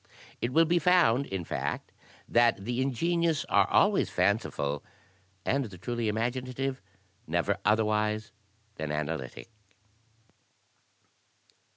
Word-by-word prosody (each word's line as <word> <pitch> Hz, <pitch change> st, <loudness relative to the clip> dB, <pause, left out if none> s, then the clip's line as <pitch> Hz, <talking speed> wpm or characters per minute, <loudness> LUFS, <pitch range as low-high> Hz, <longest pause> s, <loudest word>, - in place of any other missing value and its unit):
It 120 Hz, -, -1 dB
will 165 Hz, +5 st, +5 dB
be 170 Hz, +2 st, +2 dB
found, 155 Hz, -7 st, +4 dB
in 95 Hz, -2 st, -3 dB
fact, -, -, -3 dB, 0.4 s
that 115 Hz, -4 st, +3 dB
the 120 Hz, +2 st, -1 dB
ingenious 165 Hz, +4 st, +1 dB
are -, -, +3 dB
always -, -, +3 dB
fanciful, 70 Hz, 0 st, 0 dB, 0.6 s
and 140 Hz, 0 st, +1 dB
the 100 Hz, -5 st, -10 dB
truly 120 Hz, +5 st, -3 dB
imaginative 125 Hz, +4 st, -2 dB, 0.5 s
never -, -, 0 dB
otherwise 105 Hz, 0 st, +1 dB, 0.5 s
than 75 Hz, -1 st, -3 dB
analytic.'' 75 Hz, -, -4 dB
120 Hz, 100 wpm, -29 LUFS, 105-135 Hz, 0.6 s, will